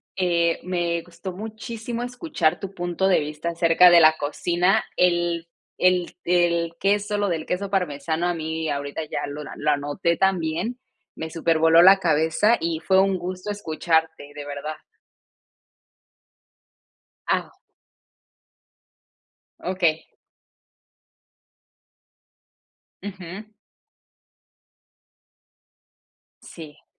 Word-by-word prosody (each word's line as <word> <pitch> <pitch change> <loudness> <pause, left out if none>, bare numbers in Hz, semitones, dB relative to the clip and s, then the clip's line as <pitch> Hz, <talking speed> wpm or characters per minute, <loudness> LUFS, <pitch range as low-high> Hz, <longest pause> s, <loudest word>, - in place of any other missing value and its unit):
eh, 170 -2 +1
me 175 -2 -1
gusto 175 +2 -9
muchísimo 225 +3 -6
escuchar 245 - -1
tu 195 0 -7
punto 175 +1 -1
de 190 - +4
vista 150 +3 -4
acerca 170 +1 +5
de 175 - +8
la 155 0 +6
cocina. 175 +7 +1
El 175 -1 +1 0.3
el 180 -1 +2
el 170 -1 +1
queso 205 +1 +1
lo 205 -1 0
del 160 -2 -2
queso 195 +2 -3
parmesano, 165 -3 -1
a 175 - 0
mí 160 -1 -3
ahorita 145 +2 -3
ya - - -4
lo 145 +1 -6
lo 150 - -1
anoté 145 +4 -1
también, 190 +4 0 0.4
me 160 - -6
supervoló 165 0 +4
la 195 +2 +8
cabeza, 165 +7 +2
y 165 -1 -2
fue 190 +3 +3
un 195 -1 +2
gusto 185 +3 -5
escucharte, 160 -5 -1
de 145 -1 -7
verdad. 145 +2 -5 2.5
Ah. - - -1 2.1
Okey. 175 -4 0 3.0
Ujú. 190 0 -8 3.0
Sí. 155 -3 -12
170 Hz, 100 wpm, -23 LUFS, 160-190 Hz, 3.0 s, de